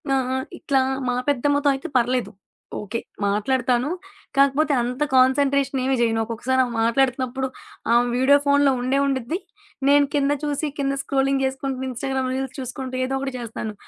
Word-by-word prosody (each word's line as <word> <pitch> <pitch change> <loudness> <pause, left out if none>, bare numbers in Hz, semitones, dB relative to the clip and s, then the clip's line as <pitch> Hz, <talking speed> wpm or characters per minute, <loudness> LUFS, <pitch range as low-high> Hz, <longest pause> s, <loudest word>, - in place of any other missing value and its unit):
ఆ! - - +3 0.2
ఆ! - - 0 0.2
ఇట్లా 270 -2 +1 0.3
మా 245 - 0
పెద్దమ్మతో 285 +1 +1
అయితే 270 +6 -6
పర్లేదు. 250 +1 0 0.5
ఓకే, 210 +3 -4 0.3
మాట్లాడతాను. 245 +5 +1 0.5
కాకపోతే 280 +2 +3
అంత 250 +3 -4
కాన్సంట్రేషనేమీ 270 0 +3
చేయను. 225 -1 +2
ఒక్కొక్కసారి 240 +3 -1
ఆమె 245 -2 -4
మాట్లాడుతున్నప్పుడు 260 +2 +1 0.5
ఆమె 240 +1 +4
వీడియో 275 +2 +5
ఫోనులో 285 0 +4
ఉండే 255 +2 +1
ఉండుద్ది. 270 +4 -1 0.5
నేను 285 0 +6
కింద 285 0 +2
చూసి, 295 +1 -1
కింద 275 0 0
స్క్రూలింగ్ 270 0 +1
చేసుకుంటూ 265 0 -3
ఇన్‌స్టాగ్రామ్ 260 +1 -2
రీల్స్ 265 0 -4
చూసుకుంటూ 260 0 -5
ఏదో 265 - -3
ఒకటి 270 -1 -4
చేస్తాను. 225 -2 -5
265 Hz, 145 wpm, -23 LUFS, 250-275 Hz, 0.5 s, నేను